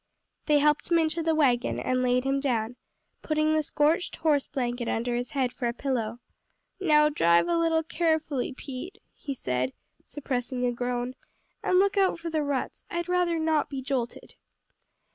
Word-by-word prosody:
They 300 -1 +5
helped 300 +2 +2
him 340 - +5
into 320 0 +1
the 325 0 +1
wagon 250 -6 +2
and 255 0 0
laid 250 0 +2
him 270 +1 +1
down, 245 -4 -1 0.5
putting 310 0 +1
the 310 - +3
scorched 305 +4 +1
horse 295 -4 +1
blanket 245 -3 -2
under 240 +2 -1
his 245 0 -2
head 260 -3 -1
for 245 - -2
a 235 - -1
pillow. 240 -4 -2 0.6
"Now 300 -5 +4
drive 170 - +3
a 340 - +1
little 330 -1 +2
carefully, 315 -5 0
Pete," 275 +8 -8 0.2
he 280 -2 -6
said, 125 - -2 0.3
suppressing 250 -2 -3
a 245 - +2
groan, 245 +1 -2 0.5
"and 365 - +2
look 400 +2 +3
out 385 -3 +3
for 335 0 -5
the 315 -1 +1
ruts, 285 -3 -3
I'd 345 0 -3
rather 355 -2 +2
not 315 -1 +1
be 270 -2 -5
jolted. 255 -3 -3
280 Hz, 170 wpm, -27 LUFS, 245-320 Hz, 0.6 s, They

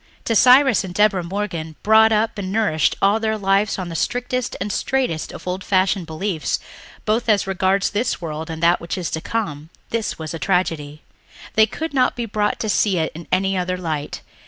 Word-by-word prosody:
To 230 - +1
Cyrus 255 0 +6
and 180 -2 -7
Deborah 210 -3 +3
Morgan, 170 -4 -4
brought 220 +1 +6
up 220 0 +1
and 190 -2 -4
nourished 205 -7 +1
all 200 +3 +4
their 220 -1 -1
lives 200 +1 +1
on 185 -2 -4
the 165 - -6
strictest 250 +6 -2
and 200 +2 -3
straightest 255 - -1
of - - -10
old 185 +1 -3
fashioned 190 -2 +1
beliefs 160 -2 -2 0.5
both 225 +2 0
as 205 -2 +3
regards 195 +1 +1
this 220 +4 -1
world 160 -1 -5
and 160 0 -5
that 170 +1 +4
which 170 - -4
is 175 -3 -3
to 160 - -3
come, 160 -10 -3 0.2
this 230 -2 -2
was 160 0 -6
a 165 - -5
tragedy. 160 -6 -1 0.5
They 220 0 +5
could 320 +4 -5
not 260 -2 +2
be 240 - -3
brought 210 -1 -1
to 220 - -2
see 205 -2 +2
it 160 -1 0
in 165 +2 -10
any 195 +1 +1
other 180 0 -1
light. 155 -4 -4
195 Hz, 200 wpm, -21 LUFS, 170-220 Hz, 0.5 s, Cyrus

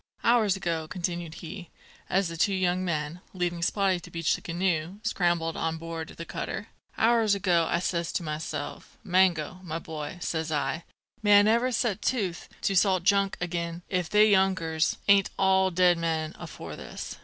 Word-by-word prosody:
"Hours 225 -4 +4
ago," 170 -4 -2
continued 175 -2 -4
he, 175 +1 -8 0.4
as 190 0 +2
the 165 - -6
two 195 +4 +2
young 185 0 +1
men, 160 -1 -2
leaving 175 -1 -1
Spottie 190 0 +1
to - - -11
beach 165 -2 0
the - - -3
canoe, 175 0 -1
scrambled 175 -6 0
on 165 0 -2
board 165 -1 -6
the 165 - -6
cutter, - - -5 0.3
"hours 225 -2 +4
ago 175 -4 +2
I - - +2
says 170 -1 -1
to - - -1
myself, 155 0 -5
'Mango, 180 -2 +2
my 165 -3 -4
boy,' 160 +1 -6
says 160 -2 -2
I, 150 +2 -1 0.4
'may 205 -1 +6
I - - +8
never 235 +4 +3
set 220 -4 0
tooth 195 -9 -1
to 195 - +1
salt 185 -1 +3
junk 200 0 +2
agin 170 -1 -3
if 180 -4 -1
they 210 +1 +6
younkers 185 -5 +2
ain't 200 -1 +5
all 190 0 +4
dead 180 -1 +3
men 160 -2 -1
afore - - -8
this.' - - -7
175 Hz, 170 wpm, -27 LUFS, 165-195 Hz, 0.4 s, I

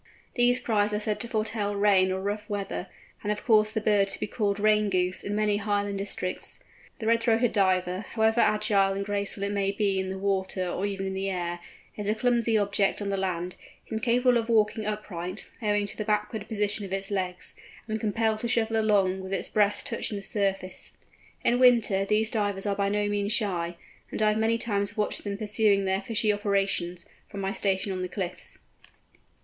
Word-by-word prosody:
These 245 0 +4
cries 210 -4 +1
are - - 0
said 210 0 -2
to 235 - -3
foretell 215 -2 -1
rain 200 -2 +4
or 190 - -1
rough 205 +1 -3
weather, 200 -2 -3 0.3
and 205 - -3
have 210 0 -2
caused 215 -1 +4
the 220 - +1
bird 205 -2 +3
to - - -4
be - - -1
called 205 -2 -1
"Rain 210 0 +3
Goose" 185 -1 0
in 205 - -2
many 210 -1 +2
Highland 205 -1 -1
districts. 190 -2 -3 0.4
The 220 - -6
Red 230 +1 +3
throated 230 0 +3
Diver, 185 -3 +2
however 220 +1 +3
agile 210 -2 +3
and 200 0 -3
graceful 200 -1 -2
it 200 - -1
may 200 -1 0
be 200 -1 0
in 190 0 -2
the 190 - -4
water 190 -1 -1
or 185 +3 -1
even 195 -1 -3
in 190 - -2
the 195 +1 -2
air, 175 -2 -3 0.4
is 205 -1 -5
a 215 - +2
clumsy 235 -1 +2
object 200 -1 +1
on 205 -1 -3
the 200 - 0
land, 180 -2 -2 0.3
incapable 240 +3 +2
of 230 0 -4
walking 215 -1 +2
upright, 195 -3 -5
owing 205 -1 +1
to 205 - -4
the 215 - -3
backward 210 0 -1
position 210 -1 -1
of 195 - -7
its 195 +1 -3
legs, 185 -2 -2 0.3
and 220 0 -2
compelled 220 0 0
to 235 - -2
shuffle 225 -1 +1
along 195 -3 +2
with 190 0 -7
its 195 - -2
breast 205 -1 +2
touching 210 - -3
the 200 - -7
surface. 195 -3 -2 0.5
In 245 +1 +3
winter 230 -6 +4
these 215 +2 +1
Divers 205 -3 -1
are 200 -1 0
by 200 0 +1
no 205 0 0
means 205 0 0
shy, 175 -6 -1 0.3
and - - -5
I 215 - +5
have 210 +1 +1
many 225 +1 +2
times 205 -2 -1
watched 210 - -1
them 200 -1 -3
pursuing 210 -2 +2
their 190 +1 +1
fishing 215 0 +1
operations, 195 -4 -1 0.2
from 200 - -7
my 195 0 -1
station 195 -1 0
on 185 -1 -3
the 185 - -3
cliffs. 180 -1 -5
205 Hz, 200 wpm, -27 LUFS, 195-215 Hz, 0.5 s, I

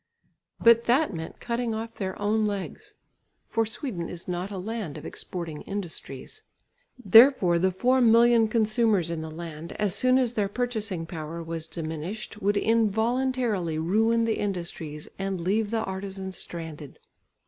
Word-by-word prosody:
But 230 0 +6
that 260 +1 +3
meant 160 -1 -7
cutting 235 -1 -2
off 225 +1 -5
their 190 -2 -4
own 215 +2 +1
legs, 200 -3 -4 0.5
for 225 -1 0
Sweden 215 - -4
is 175 -1 -8
not 180 +2 -3
a 200 - -6
land 205 -4 -4
of - - -9
exporting 165 -4 -6
industries. 190 - -7 0.6
Therefore 225 -6 +6
the 190 +2 +3
four 250 +8 +2
million 230 0 +6
consumers 215 -5 +2
in 165 -1 -3
the 160 - -6
land, 165 0 -7
as 205 -3 -1
soon 255 +5 +3
as 250 -3 +1
their 205 -4 0
purchasing 215 -7 -2
power 165 0 -6
was 165 0 -5
diminished, 165 +7 -6
would 205 +1 +2
involuntarily 225 -4 +1
ruin 225 +8 +2
the 225 - 0
industries 170 -6 -4
and 195 -1 -2
leave 205 +5 0
the 225 0 0
artisans 190 -1 -5
stranded. 160 -4 -7
200 Hz, 150 wpm, -27 LUFS, 170-230 Hz, 0.6 s, But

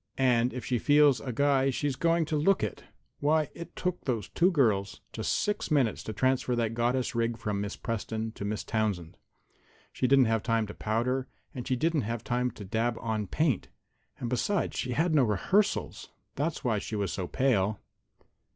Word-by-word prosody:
And 125 -2 +3
if 125 - -6
she 125 -2 0
feels 145 -4 +5
a 125 - -4
guy, 135 +1 +2
she's 135 +1 -1
going 165 +2 +2
to 155 - -2
look 160 - +3
it. 105 - -4 0.3
Why, 155 +1 +2
it 170 0 -9
took 180 -1 -2
those 115 -7 -2
two 180 +2 +3
girls 110 - +1
just - - -2
six 210 - -1
minutes 135 -8 +2
to - - -3
transfer 130 +2 +1
that 115 -2 0
goddess 120 +2 0
rig 115 -1 0
from 105 -3 -2
Miss 100 0 -4
Preston 110 0 -3
to 105 - -8
Miss 105 +1 -2
Townsend. 100 -7 -2 0.8
She 130 - 0
didn't 135 0 +6
have 115 -1 +1
time 115 -1 +1
to 105 - -8
powder, 125 +4 -1 0.3
and 125 -3 -6
she 130 - +1
didn't 160 +3 +1
have 115 +1 -4
time 125 +1 0
to 105 -3 -10
dab 115 +3 0
on 110 -3 -2
paint, 150 - 0 0.5
and, 120 - -4
besides, 130 - 0
she 125 - -2
had 155 - +2
had 175 -2 0
no 145 -4 +5
rehearsals. 190 - 0 0.2
That's 150 +3 -2
why 110 -4 +1
she 110 - -5
was 100 -3 -1
so 90 -2 -3
pale." 105 -6 +1
125 Hz, 190 wpm, -29 LUFS, 110-145 Hz, 0.8 s, didn't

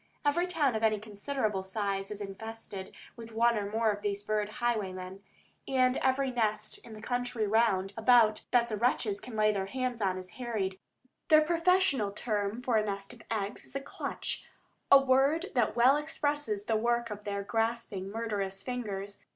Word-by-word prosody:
Every 345 +5 +2
town 305 -7 +1
of 220 - -1
any 220 -1 +3
considerable 215 0 -2
size 195 0 -2
is 210 0 -6
infested 200 -1 -7 0.2
with 230 -1 -10
one 235 +1 +3
or 205 -2 -2
more 220 +1 +2
of 205 0 -5
these 205 -1 -2
bird 210 0 0
highwaymen, 195 -5 -2 0.5
and 255 -1 +3
every 265 0 +1
nest 220 -3 -1
in 230 - -12
the 215 0 -10
country 245 -2 -1
round 205 -3 +2
about 225 -2 +5
that 240 -1 +3
the 215 -2 -3
wretches 215 -3 +1
can 245 - -8
lay 215 0 +3
hands 235 +5 -2
on 190 -2 +1
is 185 -1 -8
harried. 200 -6 -2 0.5
Their 310 0 +7
professional 335 - +2
term 210 +1 -2
for 240 -3 +2
a 215 - +3
nest 200 -1 -4
of - - -14
eggs 210 -1 -2
is - - -11
"a - - 0
clutch," 275 - -4 0.5
a 275 - +11
word 275 +7 +2
that 240 -4 +2
well 255 +4 +6
expresses 290 -8 -1
the 225 - +1
work 235 0 0
of 210 0 -6
their 200 -1 -3
grasping, 225 -3 -2
murderous 200 -3 -3
fingers. 205 -5 -4
220 Hz, 175 wpm, -30 LUFS, 200-250 Hz, 0.5 s, a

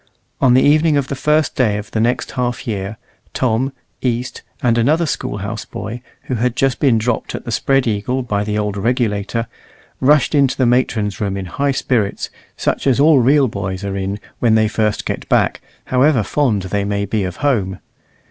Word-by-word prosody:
On 125 -2 +5
the 130 - +5
evening 155 +1 +4
of 140 -2 -1
the 140 - -2
first 150 +1 +1
day 110 -5 +2
of 105 - -7
the 110 - -1
next 120 +3 0
half 125 -1 -2
year, 100 -1 -3 0.4
Tom, 130 +2 +1 0.3
East, 125 0 -2 0.2
and 120 -2 +3
another 150 +9 +2
School 130 -6 -3
house 105 +2 -4
boy, 120 +2 -7 0.2
who - - -4
had 125 +1 0
just 135 -2 +1
been 130 -6 +4
dropped 110 +1 -1
at - - -7
the 120 - -4
Spread 135 +4 +2
Eagle 120 +4 -1
by 105 -4 -1
the 105 0 -2
old 105 -1 -1
Regulator, 115 0 0 0.5
rushed 145 +2 +3
into 140 -3 +3
the 130 - +2
matron's 110 -4 +1
room 100 -2 -1
in 95 - -4
high 140 +11 -1
spirits, 120 -6 -1 0.3
such - - -1
as 135 -1 +3
all 150 -1 +6
real 135 +3 +4
boys 100 -2 -4
are 100 -1 -3
in 100 +1 -3 0.2
when 115 -2 +3
they 110 -1 +4
first 105 0 -1
get - - -4
back, - - +2 0.2
however 130 -2 +3
fond 115 -6 0
they 100 +2 -1
may 100 0 -1
be 105 0 -1
of 90 -1 -4
home. 100 -9 +1
115 Hz, 195 wpm, -18 LUFS, 105-130 Hz, 0.5 s, all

